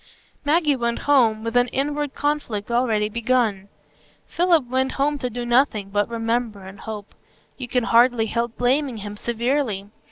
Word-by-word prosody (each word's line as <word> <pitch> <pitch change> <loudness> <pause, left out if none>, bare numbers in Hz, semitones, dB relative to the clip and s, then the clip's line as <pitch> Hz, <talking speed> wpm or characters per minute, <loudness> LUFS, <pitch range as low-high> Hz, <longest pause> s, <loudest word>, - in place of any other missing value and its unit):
Maggie 300 -1 +3
went 235 -2 -1
home, 230 -7 +3
with 230 +1 -4
an 245 0 +4
inward 290 +2 -2
conflict 245 -8 -2
already 230 -3 +1
begun; 220 -3 0 0.6
Philip 340 -4 +2
went 260 +1 0
home 290 +1 0
to 250 - -2
do 245 +1 -5
nothing 240 -5 +2
but 205 +2 0
remember 230 -2 -2
and 190 +2 -11
hope. 210 -2 -8 0.5
You 255 - -5
can 250 0 0
hardly 235 0 +4
help 235 +1 -2
blaming 255 0 +1
him 205 0 -6
severely. 235 -3 -2
240 Hz, 155 wpm, -22 LUFS, 220-270 Hz, 0.6 s, an